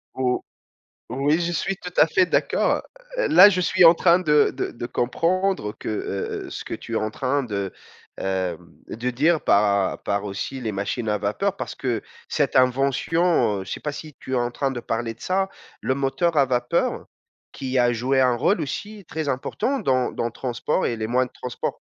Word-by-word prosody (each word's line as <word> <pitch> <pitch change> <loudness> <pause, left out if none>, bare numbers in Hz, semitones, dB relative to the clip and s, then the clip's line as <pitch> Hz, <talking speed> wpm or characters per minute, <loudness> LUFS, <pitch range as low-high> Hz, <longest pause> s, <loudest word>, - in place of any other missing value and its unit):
Ou 125 -1 0 0.7
oui 140 +6 +1
je 175 0 -1
suis 195 +4 -1
tout 180 0 -8
à - - +7
fait 185 +1 +3
d'accord, - - +1 0.4
heu, - - +2
là 185 +5 +9
je 180 -2 0
suis 185 0 +4
en 165 - +10
train 175 +1 +4
de 150 -4 +3
de - - -2
de 120 - -6
comprendre 165 - 0
que, - - -9
heu 100 -2 -3
heu, - - -8
ce - - -6
que - - -5
tu 115 - -7
es - - 0
en 110 0 -1
train 135 +3 0
de, 100 -5 -3 0.5
heu 95 -3 -1 0.3
de 120 +3 -3
dire 155 +6 +2
par 100 -1 +3
à - - -8
par 100 0 -1
aussi 105 +6 -5
les 110 -2 -2
machines 105 +3 -2
à 105 - +1
vapeur. 185 - -1
Parce - - -5
que 120 -4 -2 0.3
cette - - 0
invention, 135 - +2
heu, - - -8
je - - -8
sais - - -3
pas 150 - -3
si 150 0 -9
tu 130 - -6
es - - +3
en 120 0 0
train 135 +1 -1
de 120 - -4
parler 115 0 -3
de 115 - -24
ça, 190 +1 0 0.3
le 130 - +1
moteur 150 +4 0
à 140 - +6
vapeur 120 -1 0 0.5
qui 130 -1 -3
a 120 0 +3
joué 130 +4 +1
un 125 -2 +4
rôle 175 - +2
aussi 205 +6 -5
très 160 -3 -3
important 255 - -1
dans 130 -2 +1
dans - - -3
le 120 - -2
transport 130 +8 -2
et 115 - -1
les 110 0 -3
moyens 125 +1 +1
de - - -22
transport 125 - -4
130 Hz, 210 wpm, -23 LUFS, 115-165 Hz, 0.7 s, en